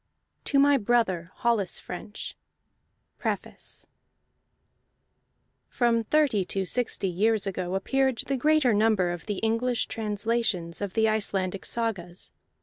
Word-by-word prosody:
A. -, -, -50 dB
TO 280 Hz, -, +2 dB
MY 285 Hz, 0 st, +6 dB
BROTHER 205 Hz, -7 st, +1 dB
HOLLIS 225 Hz, -7 st, +1 dB
FRENCH 205 Hz, +4 st, -7 dB, 0.8 s
PREFACE -, -, -4 dB, 1.8 s
From 235 Hz, -2 st, +1 dB
thirty 275 Hz, -6 st, +2 dB
to 190 Hz, +1 st, -2 dB
sixty 235 Hz, -2 st, 0 dB
years 210 Hz, +4 st, +2 dB
ago 185 Hz, -1 st, -2 dB
appeared 265 Hz, +5 st, +1 dB
the 275 Hz, -, 0 dB
greater 295 Hz, -2 st, +3 dB
number 205 Hz, -4 st, +3 dB
of 175 Hz, +2 st, -7 dB
the 205 Hz, -2 st, -2 dB
English 230 Hz, +2 st, +1 dB
translations 210 Hz, -5 st, -1 dB
of 200 Hz, -2 st, -3 dB
the 220 Hz, 0 st, +4 dB
Icelandic 195 Hz, -3 st, 0 dB
sagas. 195 Hz, -7 st, -3 dB
220 Hz, 120 wpm, -27 LUFS, 190-240 Hz, 1.8 s, MY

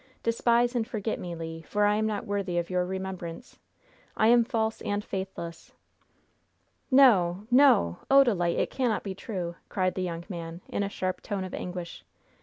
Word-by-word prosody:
Despise 235 Hz, +1 st, +2 dB
and 225 Hz, -2 st, 0 dB
forget 220 Hz, -2 st, -3 dB
me, 175 Hz, -1 st, -5 dB
Le! 165 Hz, 0 st, -6 dB
for 205 Hz, +5 st, 0 dB
I 205 Hz, -, +4 dB
am 220 Hz, 0 st, +1 dB
not 210 Hz, -2 st, -3 dB
worthy 200 Hz, -3 st, -2 dB
of 170 Hz, +1 st, -2 dB
your 180 Hz, 0 st, +1 dB
remembrance. 190 Hz, +1 st, -6 dB, 0.6 s
I 220 Hz, -, +4 dB
am 240 Hz, 0 st, +6 dB
false 225 Hz, -2 st, -1 dB
and 205 Hz, 0 st, -2 dB
faithless!" 190 Hz, -3 st, -6 dB, 1.2 s
"No, 205 Hz, -9 st, +5 dB
no! 250 Hz, -, +5 dB
Odalite, 235 Hz, -11 st, +4 dB
it -, -, 0 dB
cannot 245 Hz, -5 st, 0 dB
be 195 Hz, -, -4 dB
true!" 180 Hz, -4 st, -5 dB
cried 185 Hz, -2 st, 0 dB
the 185 Hz, -, -3 dB
young 170 Hz, -2 st, -3 dB
man, 170 Hz, -2 st, -7 dB
in -, -, -2 dB
a 200 Hz, -, -1 dB
sharp 185 Hz, -2 st, -3 dB
tone 200 Hz, -2 st, -3 dB
of 185 Hz, -, -7 dB
anguish. 180 Hz, -1 st, -6 dB
190 Hz, 170 wpm, -28 LUFS, 175-225 Hz, 1.2 s, am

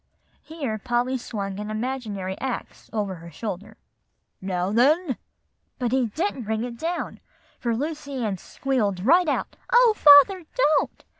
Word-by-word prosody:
Here 275 Hz, -9 st, -4 dB
Polly 240 Hz, +4 st, 0 dB
swung 200 Hz, -5 st, -4 dB
an 210 Hz, 0 st, -5 dB
imaginary 215 Hz, -5 st, -3 dB
axe 265 Hz, -2 st, -5 dB
over 210 Hz, -3 st, -2 dB
her 170 Hz, +1 st, -11 dB
shoulder, 200 Hz, +3 st, -6 dB, 0.6 s
"'Now, 185 Hz, 0 st, -1 dB
then' 275 Hz, -, +3 dB, 0.6 s
but 245 Hz, -2 st, -1 dB
he 260 Hz, -2 st, +2 dB
didn't 275 Hz, -, -3 dB
bring 220 Hz, +1 st, -1 dB
it 240 Hz, -1 st, -6 dB
down, 340 Hz, +2 st, -3 dB, 0.4 s
for 235 Hz, -2 st, -1 dB
Lucy 290 Hz, +1 st, -4 dB
Ann 195 Hz, -4 st, -2 dB
squealed 210 Hz, -9 st, -2 dB
right 345 Hz, +6 st, +5 dB
out, 295 Hz, -, -1 dB, 0.2 s
'O 480 Hz, -2 st, +6 dB
father, 300 Hz, +5 st, +7 dB
don't! 310 Hz, -, +1 dB
245 Hz, 140 wpm, -24 LUFS, 205-290 Hz, 0.6 s, father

